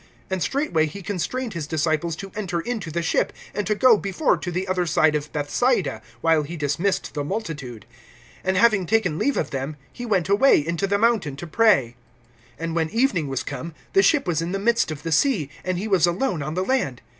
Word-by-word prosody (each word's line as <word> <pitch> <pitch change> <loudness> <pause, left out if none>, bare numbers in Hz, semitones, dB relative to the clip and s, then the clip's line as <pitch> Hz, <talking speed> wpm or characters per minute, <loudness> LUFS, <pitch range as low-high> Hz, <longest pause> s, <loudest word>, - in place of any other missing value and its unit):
(45)And 190 -1 -1
straightway 265 - +1
he 195 +6 -8
constrained 220 +6 -3
his 160 -4 -4
disciples 160 +1 0
to 195 +3 -8
enter 185 -5 -2
into 215 -2 -4
the 170 +2 -2
ship, 165 - +1 0.2
and 205 - -2
to 210 - +1
go 240 0 +6
before 200 +10 +1
to 180 - -5
the 180 +2 -2
other 180 -1 0
side 155 -1 +3
to 150 0 -2
Bethsaida, 150 - 0 0.2
while 165 -1 +3
he 160 +4 -6
dismissed 160 +6 -1
the 145 - -2
multitude. 145 - -5 0.6
(46)And 190 0 +1
having 200 -1 +4
taken 185 -8 +1
leave 285 - +1
of - - -1
them, 135 +2 -3 0.2
he 245 -1 -6
went 190 -6 +1
away 205 +8 +5
into 170 +4 -1
the 200 +1 +2
mountain 210 - +1
to 160 - -7
pray. 165 - +3 0.6
(47)And 165 0 -3
when 160 -1 0
evening 220 - +1
was 135 -2 -2
come, 155 +3 -6 0.2
the 390 - +6
ship 300 -7 +3
was 170 -4 0
in 170 +2 -3
the - - 0
midst 230 +1 +2
of 155 -1 -6
the 165 - -3
sea, 160 - +2
and 185 -1 -1
he 200 +5 -3
was 185 -5 +4
alone 180 - -1
on 150 +3 -4
the 185 +1 0
land. 190 - -1
175 Hz, 215 wpm, -23 LUFS, 155-210 Hz, 0.6 s, go